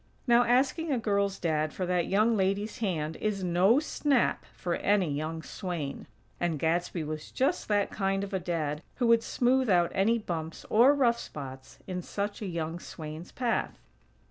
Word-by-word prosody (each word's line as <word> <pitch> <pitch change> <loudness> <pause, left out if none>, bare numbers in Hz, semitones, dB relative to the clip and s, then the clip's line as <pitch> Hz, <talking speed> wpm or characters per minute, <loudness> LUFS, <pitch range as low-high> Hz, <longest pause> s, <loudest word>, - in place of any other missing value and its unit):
Now 240 -1 +5
asking 270 +6 +2
a 265 - +2
girl's 200 -3 0
Dad 155 -2 0
for 185 - -2
that 180 -1 0
young 215 +4 +3
lady's 200 +2 0
hand 160 -8 -2
is 205 -3 -2
no 185 +8 +4
snap 290 -4 +1
for 175 - -3
any 195 -6 +2
young 155 +2 -3
swain; 165 -8 -5 0.3
and 170 -3 0
Gadsby 165 +2 0
was 155 0 -5
just 280 +7 0
that 205 -1 +1
kind 195 -1 0
of 200 0 -6
a 190 - +1
Dad 160 -4 -2
who 245 - 0
would 230 -1 +5
smooth 255 +1 +1
out 175 -3 +3
any 205 +5 +3
bumps 165 -6 -5
or 250 +6 +6
rough 240 -4 +3
spots 130 -2 -9
in 180 -1 -4
such 205 +4 -4
a 205 - -3
young 170 -1 -3
swain's 155 +1 -8
path. 245 -2 -1
190 Hz, 170 wpm, -29 LUFS, 165-230 Hz, 0.3 s, or